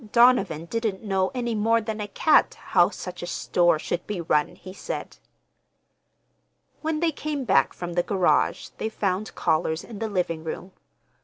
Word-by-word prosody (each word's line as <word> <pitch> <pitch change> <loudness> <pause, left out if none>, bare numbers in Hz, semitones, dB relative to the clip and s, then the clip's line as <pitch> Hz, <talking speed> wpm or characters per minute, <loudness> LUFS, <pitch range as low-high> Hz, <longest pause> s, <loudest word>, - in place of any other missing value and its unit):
Donovan 235 -10 +4
didn't 220 +1 -2
know 190 -2 +1
any 240 -2 -1
more 225 +2 +3
than 215 -1 -4
a 205 - -3
cat 305 +9 +3
how - - +5
such 180 -1 -7
a 175 - -5
store 175 -1 +2
should 175 +3 -4
be 210 -3 -3
run, 150 -3 +1
he 185 +1 -11
said. - - -6 1.6
When 315 0 -1
they 335 -1 +2
came 295 -1 -3
back 195 -6 +3
from 175 -1 -6
the 175 - +2
garage 185 0 +1
they 220 - -1
found 200 -1 -2
callers 160 0 0
in 220 -4 -9
the 225 - -2
living 175 -5 -1
room. 170 +3 -6
195 Hz, 165 wpm, -25 LUFS, 175-230 Hz, 1.6 s, how